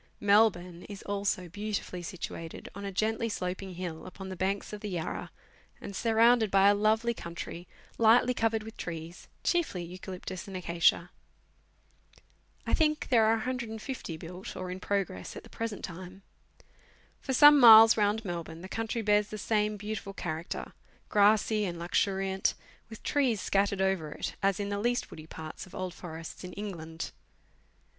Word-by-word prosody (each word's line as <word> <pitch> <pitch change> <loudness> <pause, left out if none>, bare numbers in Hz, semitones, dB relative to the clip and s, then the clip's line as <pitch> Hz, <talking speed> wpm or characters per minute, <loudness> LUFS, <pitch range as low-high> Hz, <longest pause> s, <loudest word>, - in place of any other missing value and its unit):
Melbourne 200 -4 +3
is 200 -1 -8
also 200 -2 -1
beautifully 205 -1 -4
situated 165 -1 -7
on 200 +1 -7
a 200 - -3
geutly 220 +4 0
sloping 185 -1 -4
hill, 175 -2 -6
upon 190 +1 -8
the 190 - -5
banks 195 +3 -2
of 210 - -6
the 210 - -4
Yarra, 175 -4 -4 0.5
and 200 - -8
surrounded 230 +1 +4
by 195 +1 +5
a - - +6
lovely 220 +3 +2
country, 170 -2 -7 0.3
lightly 235 +2 +5
covered 225 -2 0
with 220 +1 -10
trees, 165 0 -7 0.2
chiefly 330 - 0
eucalyptus 185 +1 -7
and 190 -1 -5
acacia. 170 0 +2 1.5
I - - -2
think 305 -1 +2
there 230 -3 +5
are 220 +1 +4
150 235 - -4
houses 160 - -8
built, 180 +3 -8
or 185 -1 -5
in 185 - -5
progress, 190 - -2
at - - -8
the - - -15
present 225 -2 -4
time. 185 +2 -10 1.0
For 270 - -4
some 295 +2 +8
miles 225 -2 +10
round 210 +1 +1
Melbourne, 170 -2 -5
the - - -6
country 225 +2 -3
bears 210 0 +3
the 215 - -6
same 210 0 0
beautiful 205 -1 -5
character 165 -3 -5 0.4
grassy 210 +1 +4
and 175 -3 -3
luxuriant, 190 +2 0 0.3
with 220 - -11
trees 260 -7 +1
scattered 200 0 +1
over 190 -6 0
it, - - -5
as 195 -1 +2
in 200 0 -2
the 200 - -1
k'ust 245 +2 0
woody 155 0 -10
parts 160 +2 -8
of - - -13
old 185 -1 -4
forests 165 -1 -8
in 180 - -7
England. 165 -6 -6
200 Hz, 160 wpm, -30 LUFS, 180-220 Hz, 1.5 s, miles